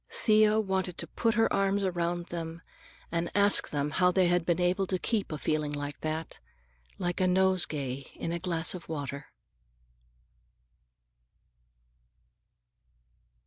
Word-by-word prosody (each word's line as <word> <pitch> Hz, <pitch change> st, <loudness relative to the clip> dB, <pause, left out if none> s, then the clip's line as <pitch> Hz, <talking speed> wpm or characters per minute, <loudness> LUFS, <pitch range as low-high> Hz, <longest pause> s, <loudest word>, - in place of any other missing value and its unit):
Thea 215 Hz, -1 st, +3 dB
wanted 190 Hz, -4 st, -2 dB
to -, -, -3 dB
put 230 Hz, -2 st, 0 dB
her 225 Hz, 0 st, +2 dB
arms 195 Hz, 0 st, +1 dB
around 175 Hz, -1 st, -1 dB
them 165 Hz, -1 st, -6 dB, 0.5 s
and 170 Hz, 0 st, -1 dB
ask 205 Hz, 0 st, +5 dB
them 145 Hz, 0 st, -2 dB
how 180 Hz, +3 st, +3 dB
they 180 Hz, -1 st, +3 dB
had 175 Hz, -1 st, +1 dB
been 170 Hz, 0 st, +1 dB
able 185 Hz, +2 st, +1 dB
to 185 Hz, -, 0 dB
keep 210 Hz, 0 st, -2 dB
a 155 Hz, -, -3 dB
feeling 150 Hz, 0 st, -1 dB
like 145 Hz, 0 st, -5 dB
that, 155 Hz, +1 st, -4 dB, 0.6 s
like 175 Hz, -1 st, -2 dB
a 185 Hz, -, +3 dB
nosegay 165 Hz, -8 st, +1 dB
in 165 Hz, -, -4 dB
a 170 Hz, -, -2 dB
glass 170 Hz, -2 st, +1 dB
of 180 Hz, -3 st, -9 dB
water. 145 Hz, -2 st, -5 dB
175 Hz, 135 wpm, -29 LUFS, 160-190 Hz, 0.6 s, ask